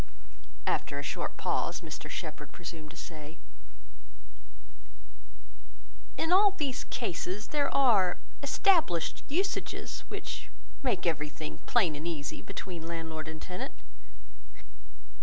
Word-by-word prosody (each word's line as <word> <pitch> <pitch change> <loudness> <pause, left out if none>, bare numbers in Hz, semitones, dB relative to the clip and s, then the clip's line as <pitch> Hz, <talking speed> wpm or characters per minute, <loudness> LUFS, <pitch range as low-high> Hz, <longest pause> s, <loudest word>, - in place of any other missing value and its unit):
After 140 - +1
a 145 - -2
short 140 - -2
pause, - - +1
Mr - - -6
Shepherd 150 -2 -5
presumed 165 -2 -7
to 165 - -11
say— 155 -1 -7 2.8
"In 325 - +1
all 395 +2 +8
these 280 -5 0
cases, 195 -2 -2
there 290 -2 +2
are 220 -10 +5 0.2
established 285 - +4
usages 375 +7 0
which 405 0 -4 0.3
make 240 -10 +1
everything 150 - -1
plain 185 -11 +4
and 155 +3 -3
easy 145 -4 -2
between 175 -4 -5
landlord 160 -2 -3
and 160 0 -5
tenant. 180 +2 -4
170 Hz, 105 wpm, -32 LUFS, -, 2.8 s, all